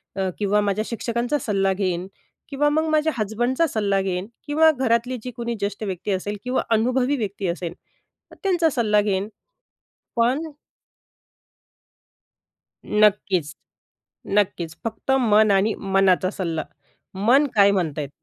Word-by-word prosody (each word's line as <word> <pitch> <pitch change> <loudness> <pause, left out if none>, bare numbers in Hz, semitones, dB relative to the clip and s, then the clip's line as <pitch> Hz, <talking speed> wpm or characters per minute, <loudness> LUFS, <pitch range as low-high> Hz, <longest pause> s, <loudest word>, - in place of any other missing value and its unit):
अ, 190 -1 -1
किंवा 210 0 +2
माझ्या 205 +1 0
शिक्षकांचा 235 +4 -1
सल्ला 195 -4 0
घेईन 185 -2 -2 0.4
किंवा 295 +1 +1
मग 315 +2 +1
माझ्या 310 0 +2
हसबंडचा 240 +8 0
सल्ला 205 -7 0
घेईन 185 0 -3 0.2
किंवा 315 +2 +5
घरातली 250 -2 0
जी 250 - -5
कोणी 235 0 -3
ज्येष्ठ 200 +1 -3
व्यक्ती 195 0 -3
असेल 205 +2 -2
किंवा 250 +1 0
अनुभवी 250 +5 +2
व्यक्ती 200 -4 -3
असेल 170 0 -3 0.6
तर - - -13
त्यांचा 350 -4 +2
सल्ला 215 -6 +2
घेईन, 200 -1 -1 0.9
पण 240 +5 +2 2.4
नक्कीच. 195 -7 +2 0.9
नक्कीच. 175 -5 -1
फक्त 225 +3 -4 0.2
मन 215 +1 +5
आणि 200 +2 +3
मनाचा 195 -2 +2
सल्ला. 165 -6 -3 0.6
मन 275 +5 +5
काय 200 -1 +6
म्हणत 170 -7 -1
आहे. 145 - -3
210 Hz, 130 wpm, -23 LUFS, 195-245 Hz, 2.4 s, काय